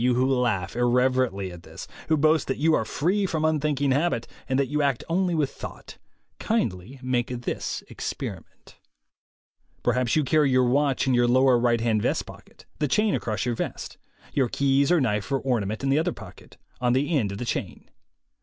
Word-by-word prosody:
You 125 0 +3
who 125 +1 +2
laugh 120 -8 0
irreverently 120 -5 +1
at 90 -1 -11
this, - - -10 0.2
who 160 - +3
boast 155 +2 +3
that 135 - -1
you 160 +3 +3
are - - +2
free 195 +6 0
from 160 -3 -1
unthinking 150 -3 +1
habit, 140 -4 +1 0.2
and 130 - +1
that 140 - +2
you 150 +2 -1
act 140 -4 0
only 175 +1 +1
with 150 -4 0
thought, - - -10 0.4
kindly 125 - -2
make 125 -1 0
this 125 -1 -4
experi - - -4
ment. - - -23 1.1
Perhaps 125 -2 +1
you 155 - +3
carry 150 +1 +3
your 130 -1 +4
watch 135 +2 +2
in 130 - +2
your 120 0 +3
lower 130 0 +4
right 120 -1 +2
hand 110 -2 +1
vest - - 0
pocket, - - -15
the 150 - +1
chain 210 +8 +2
across 110 -2 -2
your 120 - 0
vest, - - -5 0.3
your 130 -4 +1
keys 140 +4 +2
or 175 - +5
knife 105 -2 -1
or 135 - +3
ornament 115 -4 -2
in 135 - 0
the 140 - +3
other 170 +2 0
pocket - - -13 0.2
on 125 -1 +2
the 145 +6 +1
end 110 -8 +1
of - - -6
the 125 - -4
chain. - - -4
130 Hz, 195 wpm, -25 LUFS, 120-150 Hz, 1.1 s, or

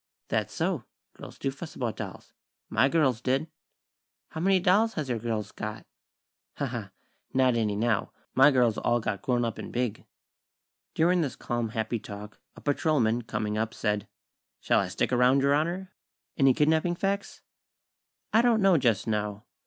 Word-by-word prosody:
"That's - - 0
so. - - -1 0.3
Girls - - -11
do 135 - -2
fuss 155 +4 -9
about 120 -4 -3
dolls. - - -8 0.4
My 135 - +3
girls 135 -7 +2
did." 135 +5 0 0.8
"How 160 - -5
many 190 +1 +4
dolls 205 +6 +3
has 150 -5 -3
your 120 -2 -1
girls 110 -2 -3
got?" 105 0 -6 0.7
"Ha, - - -1
ha! - - -5 0.5
Not 130 -1 +4
any, 110 -3 0
now. 115 0 0 0.2
My 135 +3 +7
girls 125 -5 +2
all 120 0 +2
got 110 -4 -3
grown 120 0 +1
up 115 -2 -4
and - - -7
big." 120 -3 -2 0.9
During 175 +2 +3
this 140 -6 -2
calm, 120 -1 -2
happy 110 +1 -2
talk, 105 0 -9 0.2
a - - -13
patrolman, 135 -6 +1
coming 105 -2 -2
up, 110 0 -2
said: 105 -1 -1 0.5
"Shall - - +2
I 100 - 0
stick 95 +7 -1
around, 125 +2 +4
Your 140 0 +4
Honor? 175 +5 -1 0.4
Any 135 -4 +4
kidnapping 160 +3 +2
facts?" 200 +2 -2 0.9
"I 225 - +6
don't 235 -2 +3
know, 190 -5 +5
just 115 -7 +2
now. 105 -1 -2
125 Hz, 165 wpm, -28 LUFS, 110-155 Hz, 0.9 s, My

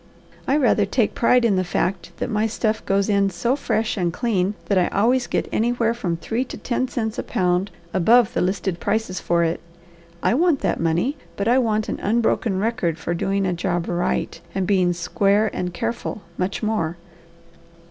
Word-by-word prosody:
I 275 - +3
rather 225 -7 +3
take 225 +1 +1
pride 245 +1 +3
in 205 -5 +3
the 185 - +2
fact 180 0 -2
that - - -2
my 215 +1 +1
stuff 220 0 -1
goes 195 0 +2
in 200 -2 +2
so 235 +8 0
fresh 225 -6 -1
and 175 -3 0
clean 200 -1 0
that 200 -2 +2
I 180 - +2
always 240 +5 +2
get - - -1
anywhere 230 0 +1
from 180 -8 -2
three 225 +8 -2
to - - -8
ten 255 +1 -1
cents 220 -4 -3
a - - -2
pound 180 +1 0 0.2
above 225 +5 +4
the - - 0
listed 185 -1 -1
prices 215 -4 -1
for 170 0 +1
it. 165 0 0 0.6
I - - +3
want 320 +1 +2
that - - 0
money, 170 - 0 0.2
but 200 - -1
I 245 +3 +5
want 215 -3 0
an - - -3
unbroken 220 -1 +1
record 200 -6 0
for 170 +1 -3
doing 195 +3 0
a 185 - 0
job 175 0 -1
right 175 0 -1
and 190 -1 0
being 185 -2 +3
square 200 +4 +1
and 180 0 -3
careful, 215 +3 -4
much 185 +5 -2
more." 195 -7 -1
200 Hz, 190 wpm, -22 LUFS, 180-230 Hz, 0.6 s, I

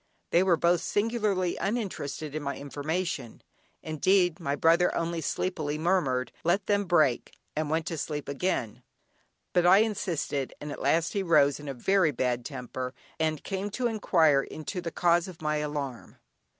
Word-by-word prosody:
They 170 - +5
were 185 -3 +3
both 170 +1 +3
singularly 205 -3 0
uninterested 185 - -3
in 155 - -3
my 140 -1 -3
information 145 -1 -4 0.4
(indeed 175 +2 +2
my 140 -4 -1
brother 165 +4 +4
only 165 0 -1
sleepily 155 -2 -2
murmured 155 -7 +1
"let 185 +4 +2
them 205 -1 +1
break" 155 -9 +2 0.2
and 155 0 -1
went 160 +1 0
to 165 -3 -3
sleep 150 -1 -4
again) 140 - -2 0.7
but 175 -1 +4
I 185 +2 +8
insisted, 165 - -2
and 150 0 -6
at - - -7
last 165 0 +2
he 200 - 0
rose 150 -6 +4
in 150 - -9
a 135 - -4
very 190 +6 +3
bad 125 -4 -1
temper 125 +1 -5 0.2
and 155 -2 0
came 195 +1 -3
to 255 - -1
inquire 165 -10 +3
into 155 +6 -6
the 170 - -3
cause 170 +1 +2
of 180 -3 -10
my 150 -1 0
alarm. 145 -5 -4
165 Hz, 165 wpm, -28 LUFS, 145-185 Hz, 0.7 s, I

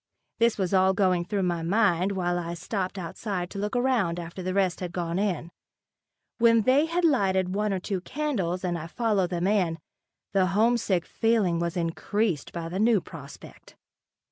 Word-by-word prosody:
This 230 -1 +3
was 190 -2 -1
all 190 0 +4
going 185 -3 +2
through 200 +1 -1
my 175 -2 0
mind 190 0 +2
while 175 -2 0
I 170 0 -4
stopped 185 +2 -3
outside 180 +1 -4
to 200 - -5
look 210 +4 -2
around 240 -9 +1
after 170 +2 -7
the 185 +1 -3
rest 190 -3 +1
had 180 -2 -4
gone 170 0 -2
in. 180 -5 -1 0.9
When 230 -1 +5
they 275 +7 +4
had 340 +1 0
lighted 190 - +2
one 210 +1 0
or 190 - -1
two 185 0 -3
candles 195 - -2
and 175 -2 -1
I 160 - -6
followed 205 -2 0
them 175 -1 -1
in, 185 -5 +1 0.6
the 190 -2 +3
homesick 220 -6 +2
feeling 215 -7 +1
was 170 +1 -2
increased 170 0 -1
by 170 -1 -5
the 180 +3 -4
new 220 0 +4
prospect. 145 -5 -12
190 Hz, 175 wpm, -26 LUFS, 175-215 Hz, 0.9 s, When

